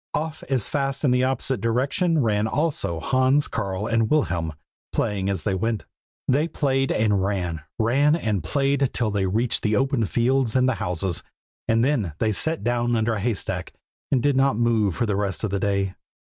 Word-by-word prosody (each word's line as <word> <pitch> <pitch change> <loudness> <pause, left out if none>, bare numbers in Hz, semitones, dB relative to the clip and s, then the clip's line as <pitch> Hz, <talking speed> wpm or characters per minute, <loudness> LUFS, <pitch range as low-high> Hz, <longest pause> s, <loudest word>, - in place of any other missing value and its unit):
Off 155 +1 -3
as 130 -6 +1
fast 135 -1 -2
in 140 - +3
the 125 0 +3
opposite 130 -3 -1
direction 135 - +1
ran 105 -1 +1
also 140 - -1
Hans, 130 - +2
Karl, 95 +1 -3
and 115 -1 +1
Wilhelm, 90 - +1 0.4
playing 100 -2 -1
as 95 -5 -1
they 100 - 0
went. 110 +3 -1 0.4
They 145 +5 +2
played 135 -4 0
and 105 -3 +2
ran, 90 -5 -2 0.2
ran 140 +7 +3
and 105 - -1
played 135 - +1
till 115 -3 +1
they 100 -2 0
reached 115 +5 +1
the 105 -1 +1
open 135 -2 +1
fields 120 +2 +1
and 130 0 +4
the 130 - +2
houses; 90 0 -1 0.5
and 115 +1 +3
then 115 - 0
they 110 +3 +1
sat 160 +10 0
down 120 0 +1
under 110 0 +1
a 110 - -2
haystack 110 -2 -2 0.4
and 130 -4 +2
did 145 -2 +3
not 135 -3 +3
move 115 -6 +2
for 120 - 0
the 105 -3 0
rest 100 -1 -2
of 110 - -1
the 100 - 0
day. 100 -1 0
115 Hz, 185 wpm, -24 LUFS, 100-135 Hz, 0.5 s, and